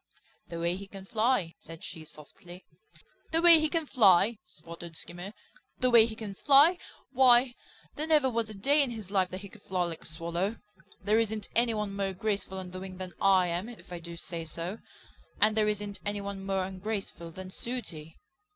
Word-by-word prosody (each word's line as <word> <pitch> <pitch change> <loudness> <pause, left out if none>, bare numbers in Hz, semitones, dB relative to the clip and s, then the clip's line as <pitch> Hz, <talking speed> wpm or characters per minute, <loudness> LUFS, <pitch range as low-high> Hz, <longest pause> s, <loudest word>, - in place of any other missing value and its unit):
"The 170 - -6
way 170 +1 0
he 200 0 -9
can 195 -1 -10
fly," 215 -5 +1
said 165 0 -11
she 160 -1 -7
softly. 165 +4 -13 0.7
"The 325 - +3
way 335 -1 +8
he 310 0 +1
can 330 -1 -1
fly!" 210 -4 +4
sputtered 170 -1 -9
Skimmer, 175 +3 -6 0.5
"The 255 0 +2
way 230 -1 +7
he 220 - -7
can 215 -3 -6
fly! 290 - +5 0.3
Why, 250 -1 +5 0.4
there 310 +1 -3
never 305 -4 +4
was 230 -3 -1
a 215 - -8
day 280 +9 +3
in 275 - +2
his 215 -5 -7
life 190 -2 +2
that 185 +1 -6
he 200 - -8
could 215 +1 -16
fly 185 -2 -1
like 170 -2 -4
a - - -9
Swallow. 170 +6 -2 0.5
There 215 +2 +3
isn't 220 -2 -2
any 235 -1 +3
one 210 -2 -3
more 195 -1 -1
graceful 195 -1 -2
on 185 -1 -6
the 185 - -6
wing 185 -1 -8
than 185 -1 -6
I 190 -2 +4
am, 175 +6 -3
if 230 -6 -12
I 175 - -5
do 170 0 -9
say 170 0 -5
so. 170 +6 -5 0.6
And 215 +1 +4
there 215 -1 +3
isn't 205 -1 -2
any 205 0 -2
one 200 -1 -6
more 195 -1 0
ungraceful 190 -2 -5
than 185 +1 -8
Sooty." 180 -11 -4
195 Hz, 200 wpm, -29 LUFS, 180-230 Hz, 0.7 s, way